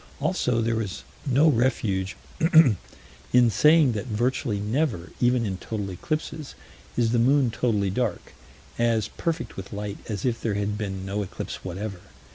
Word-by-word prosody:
Also 120 -2 +1
there 115 0 0
is 100 -4 -5 0.2
no 140 +4 +4
refuge 115 -8 +1 1.2
in 120 -2 +6
saying 150 +4 +5
that 110 +1 -4
virtually 120 -1 0
never, 110 - -1
even 120 -1 +3
in 95 -3 -2
total 100 0 -4
eclipses, 155 - -4 0.4
is 115 -2 +2
the 120 - +2
moon 130 +1 +4
totally 105 -5 0
dark - - -2 0.5
"as 115 -2 +2
perfect 165 -1 -3
with 95 0 -7
light 105 0 -5
as 105 0 -3
if 120 -2 0
there 110 -3 -1
had 105 0 -1
been 95 -3 -4
no 100 +2 -2
eclipse 100 - -6
whatever." 95 +1 -5
115 Hz, 150 wpm, -25 LUFS, 100-125 Hz, 1.2 s, in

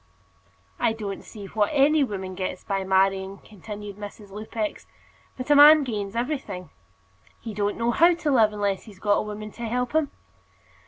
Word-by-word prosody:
"I 225 - +2
don't 205 -3 -6
see 210 -3 -10
what 205 +2 0
any 295 +1 +4
woman 190 -6 -4
gets 185 0 -4
by 195 -1 -2
marrying," 190 0 +1
continued 205 -1 -9
Mrs. 205 0 -10
Lupex. 215 +1 -5 0.5
"But 255 +3 -3
a - - +7
man 295 +1 +9
gains 210 -5 -4
everything. 235 - -3 0.7
He 225 -2 -7
don't 205 0 -1
know 235 +1 +1
how 340 +7 +5
to 330 -3 -1
live, 225 -5 +4
unless 200 -2 -2
he's 210 -4 -13
got 205 +2 +2
a - - 0
woman 215 0 -6
to 235 - -9
help 245 +2 -1
him." 315 -2 +2
210 Hz, 170 wpm, -25 LUFS, 200-250 Hz, 0.7 s, man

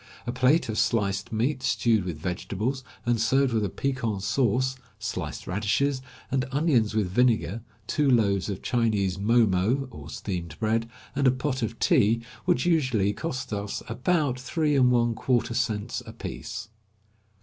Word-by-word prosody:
A 120 - -1
plate 130 +4 +3
of 110 -1 -1
sliced 100 -3 0
meat 125 +5 0
stewed 115 -5 +2
with 85 -4 -4
vegetables, 100 - -3 0.2
and 120 -2 +1
served 135 +2 +3
with 110 -2 +1
a 100 - 0
piquant 115 -5 -2
sauce, 130 +4 +1 0.2
sliced - - -4
radishes 120 +8 0 0.3
and 130 -1 +1
onions 135 -7 +2
with 105 -4 +2
vinegar, 115 0 +2 0.2
two 145 +4 +1
loaves 100 -6 +2
of 100 -2 -5
Chinese 105 -6 +1
mo 115 +3 +4
mo, 110 +8 +1
or 70 -3 -10
steamed 90 -4 -5
bread, 115 +1 0 0.3
and 140 -1 +3
a - - +6
pot 130 0 -2
of 115 0 -2
tea, 115 +2 +3 0.2
would 125 - +2
usually 130 - +2
cost 130 -2 -4
us 100 0 -3
about 130 +2 0
three 150 +3 0
and 130 -2 +5
one 120 -1 +3
quarter 120 +1 0
cents 110 -4 -1
apiece. - - -6
115 Hz, 155 wpm, -26 LUFS, 105-130 Hz, 0.3 s, a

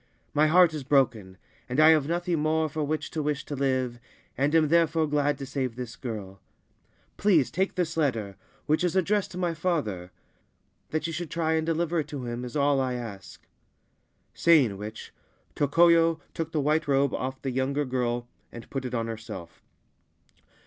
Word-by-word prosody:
My 150 +1 +4
heart 175 +1 +5
is 150 -3 -4
broken, 120 -9 +1 0.3
and 125 +4 -1
I 155 +1 +8
have 155 -3 +4
nothing 175 0 -1
more 155 +1 +1
for 155 +1 -3
which 155 +2 -3
to 155 - -2
wish 150 -1 -2
to 145 - -5
live, 130 -3 -1 0.4
and 140 +4 +1
am 155 -2 +4
therefore 165 -1 +3
glad 145 -1 +1
to 135 - -6
save 130 -3 -3
this 125 -2 -6
girl. 105 -7 -7 0.8
Please 165 - +3
take 190 +1 -1
this 175 -3 -1
letter, 115 -11 -1 0.3
which 155 +3 +1
is 180 -1 0
addressed 195 +2 +1
to 180 - -9
my 175 -2 0
father. 110 - -2 0.8
That 155 0 -2
you 165 - -3
should 170 0 -4
try 165 -1 0
and 160 0 0
deliver 165 +1 0
it 150 - -2
to 140 -4 -6
him 120 +1 -4
is 125 -1 -7
all 140 -1 +3
I 130 -1 -1
ask.' 105 -6 -8 0.9
Saying 145 -11 +4
which, 105 +2 -8 0.4
Tokoyo 165 +2 +4
took 165 -1 -4
the 155 - 0
white 155 +2 +1
robe 140 0 +2
off 130 +1 -3
the 135 - -1
younger 135 +3 0
girl 120 -2 -2 0.2
and 120 - -10
put 135 -2 -3
it 125 0 -3
on 115 -1 -1
herself. 110 -7 -8
145 Hz, 180 wpm, -27 LUFS, 125-160 Hz, 0.9 s, I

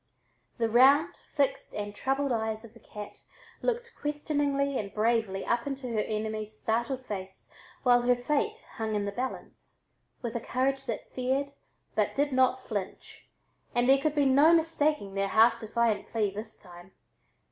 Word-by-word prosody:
The 230 - +1
round, 275 +9 +5
fixed 280 -2 -1
and 205 0 -4
troubled 270 +5 -1
eyes 220 -1 -2
of 225 - -14
the 230 - -16
cat 210 -2 -10 0.4
looked 480 -1 -2
questioningly 285 -2 -1
and 200 -2 -5
bravely 220 -3 0
up 235 +2 0
into 275 -2 -4
her 225 -2 -1
enemy's 215 0 -3
startled 240 +4 -1
face 190 -3 -7 0.3
while 245 -2 +5
her 245 +1 +3
fate 300 - -1
hung 220 -1 -2
in 205 -1 0
the 200 - -2
balance, 255 +5 -7 0.4
with 235 -2 -3
a - - 0
courage 265 +3 -1
that 230 -3 -5
feared 265 +3 -1 0.4
but - - 0
did 285 +1 +1
not 260 0 +2
flinch, 200 -4 -6 0.5
and 240 +1 +3
there 270 +1 +5
could 310 0 0
be 290 -1 +3
no 280 +4 +6
mistaking 305 -9 +1
their 195 0 0
half 230 +3 +5
defiant 225 -1 0
plea 215 -3 0
this 215 +2 -8
time. 175 0 -14
240 Hz, 160 wpm, -29 LUFS, 215-280 Hz, 0.5 s, no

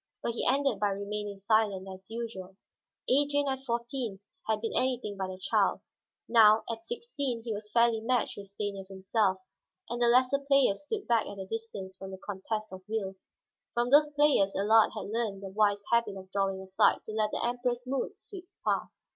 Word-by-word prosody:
But - - 0
he 230 - -1
ended 270 -4 +2
by 205 - +2
remaining 200 +1 -4
silent, 200 -2 +1
as 190 0 -10
usual. 220 -5 -6 0.5
Adrian 285 +1 +3
at 265 -1 -2
fourteen 235 -3 -2 0.3
had 220 -1 +1
been 225 - -3
anything 250 -5 0
but 190 -1 -3
a 185 - -6
child; 185 - +1 0.5
now, 220 -2 +6
at 230 +7 -4
sixteen, 285 - -3
he 225 -2 -3
was 210 0 -6
fairly 235 0 +3
matched 245 0 0
with 200 -1 -9
Stanief 200 -1 -5
himself, 195 +1 0 0.5
and 240 +1 -4
the 240 - +5
lesser 255 +3 +4
players 275 -3 +2
stood 415 +5 -3
back 230 -2 +2
at 200 - -7
a 190 - -5
distance 200 -3 -6
from 195 - -8
the 190 - -7
contest 210 +2 -5
of 190 - -8
wills. 195 -3 -4 0.5
From 240 +1 +1
those 295 +1 +6
players 290 -10 +3
Allard 215 +3 +5
had 200 - -5
learned 215 -4 -2
the 195 - -5
wise 205 0 +2
habit 230 -4 +2
of 190 0 -11
drawing 195 -1 0
aside 190 0 +3
to - - -6
let 215 -1 +1
the - - -2
Emperor's 245 0 -1
moods 275 +10 -3
sweep 375 -3 -10 0.2
past. - - -1
220 Hz, 190 wpm, -30 LUFS, 195-245 Hz, 0.5 s, now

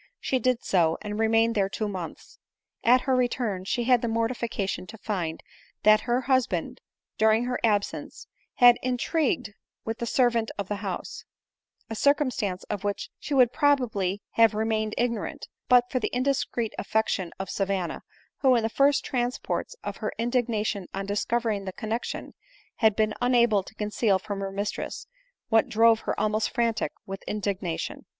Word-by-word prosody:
She 260 - 0
did 255 -2 +1
so, 165 -4 +2
and 210 0 -4
remained 225 +1 +3
there 195 -3 +1
two 215 +2 -2
months. 185 -4 -7 0.4
At 250 +2 +5
her 265 -1 +1
return 240 -6 -1
she 240 +4 0
had 245 -1 +4
the 235 - -1
mortification 230 -4 -2
to 225 - -10
find 180 -7 -3 0.4
that 215 0 +6
her 245 +2 +2
husband, 260 -1 0 0.4
during 220 +1 +4
her 250 0 -2
absence, 205 -3 -1 0.3
had 245 -1 +7
intrigued 255 -2 0 0.3
with 225 0 -3
the 235 - -3
ser 245 +1 +3
vant 230 -1 -1
of 200 -2 -3
the 205 - -1
house; 195 -3 -5 0.6
a - - -5
circumstance 250 -8 +1
of 210 -2 -5
which 205 -1 -3
she 290 - -3
would 250 -3 +5
probably 235 - +1
have 225 -2 +4
remained 215 0 0
ignorant, 235 -2 -2 0.2
but 245 -1 +5
for 255 - +1
the - - -1
indiscreet 255 -3 0
affection 205 -4 0
of 190 - -5
Savanna, 195 -3 -2 0.4
who, 260 -2 +5
in 230 - +2
the 225 - 0
first 280 +4 +3
transports 245 - -2
of - - -5
her - - -3
indignation 225 -5 -1
on 195 0 -3
discovering 210 0 -1
the 190 - -5
connexion, 225 +3 -4 0.4
had 220 -3 +4
been 215 -1 +1
una 245 -1 +4
ble 210 -3 +2
to 205 - -14
conceal 210 -1 +1
from 200 +1 -5
her 195 0 -3
mistress 200 +1 -4 0.4
what 225 -1 +3
drove 225 0 +5
her - - -3
almost 215 +1 +1
frantic 235 -2 0
with 195 0 -6
indignation. 195 -5 -3
225 Hz, 165 wpm, -26 LUFS, 205-245 Hz, 0.6 s, had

